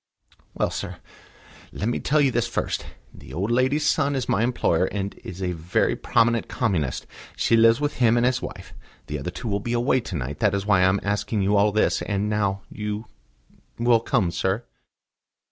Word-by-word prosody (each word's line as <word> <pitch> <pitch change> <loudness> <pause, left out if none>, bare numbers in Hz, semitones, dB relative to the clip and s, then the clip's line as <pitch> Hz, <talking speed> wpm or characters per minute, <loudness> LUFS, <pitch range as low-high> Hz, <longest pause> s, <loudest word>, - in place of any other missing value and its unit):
"Well, - - 0
sir, - - -5 0.7
let 105 - -3
me 120 - 0
tell 150 +1 +2
you 135 -2 +3
this 120 0 0
first. 120 - -2 0.3
This 65 - -12
old 95 +8 -1
lady's 130 +5 +2
son 145 -2 +2
is 130 -3 -2
my 105 - +1
employer, 115 -8 +2
and 100 0 -3
a 90 0 -4
very 85 0 0
prominent 115 -1 +2
Communist. 90 - -1 0.3
She 115 - +2
lives 115 +1 +5
with 145 0 -2
him 120 -2 +4
and 120 - +3
his 125 0 +1
wife. - - -8 0.3
The 75 0 -4
other 70 - -4
two 115 +7 -7
will 100 -1 0
be 120 +4 -3
away 120 +2 +2
to 110 -6 -6
night. 70 0 -4
That 100 -2 +2
is 100 0 -2
why 105 -3 +4
I 90 - +5
am 95 +2 +1
asking 105 +1 -1
you 100 +2 +2
all 105 +1 +4
this. 110 +1 +1
And 105 0 -1
now, 100 -2 0
you 105 +1 -4 0.7
will 120 0 +4
come, 110 -6 0
sir?" 95 +6 -1
105 Hz, 195 wpm, -24 LUFS, 95-120 Hz, 0.7 s, lives